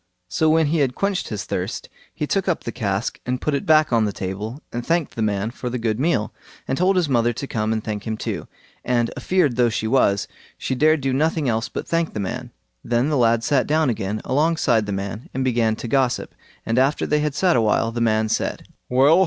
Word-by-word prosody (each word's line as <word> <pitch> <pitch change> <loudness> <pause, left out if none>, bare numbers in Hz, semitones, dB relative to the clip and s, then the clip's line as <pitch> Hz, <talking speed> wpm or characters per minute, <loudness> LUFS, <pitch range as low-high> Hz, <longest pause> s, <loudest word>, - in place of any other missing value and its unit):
So 155 - +2
when 160 0 +4
he 155 +2 +1
had 130 -3 +1
quenched 195 -2 -1
his 105 -3 -4
thirst, - - -4 0.2
he 150 - -3
took 195 +5 0
up 175 - 0
the 115 - -4
cask 105 -2 -2
and 125 0 -2
put 150 - -1
it 140 +7 -2
back 155 -4 +4
on 115 -2 +4
the 105 - -1
table, 100 +7 -5
and 120 0 -3
thanked 165 +2 0
the 115 - -3
man 105 0 0
for 125 0 -5
the 125 - -2
good 115 -1 -1
meal, 145 -7 +1 0.3
and 130 - 0
told 185 +5 +2
his 180 -3 +2
mother 120 -3 +2
to 140 - -5
come 110 -4 -1
and 110 -1 -1
thank 105 0 -4
him 110 0 -2
too, - - -4 0.4
and 120 -2 +1
a - - -5
feared 165 -10 +1
though 120 -1 +4
she 110 - -2
was, 110 -4 +2 0.3
she - - -2
dared 155 +3 +3
do 135 -1 0
nothing 155 +1 +1
else 115 -1 0
but - - -5
thank 165 -1 0
the - - -2
man. 120 +6 -4 0.3
Then 120 +4 +1
the 150 - +1
lad 115 -3 +3
sat 130 +2 +2
down 155 -3 +2
again 105 -1 -3
alongside 135 -6 +2
the - - -2
man 100 +3 -5
and 135 - 0
began 115 -3 +2
to 120 - -6
gossip, 130 0 0 0.3
and 115 +2 +1
after 135 +3 +2
they 150 - +1
had 150 -1 -1
sat 180 0 +3
a 120 - +4
while, 110 +1 +2
the 120 0 -3
man 110 -1 +2
said, - - -2 0.2
"Well! 140 +7 +5
125 Hz, 235 wpm, -22 LUFS, 110-150 Hz, 0.4 s, Well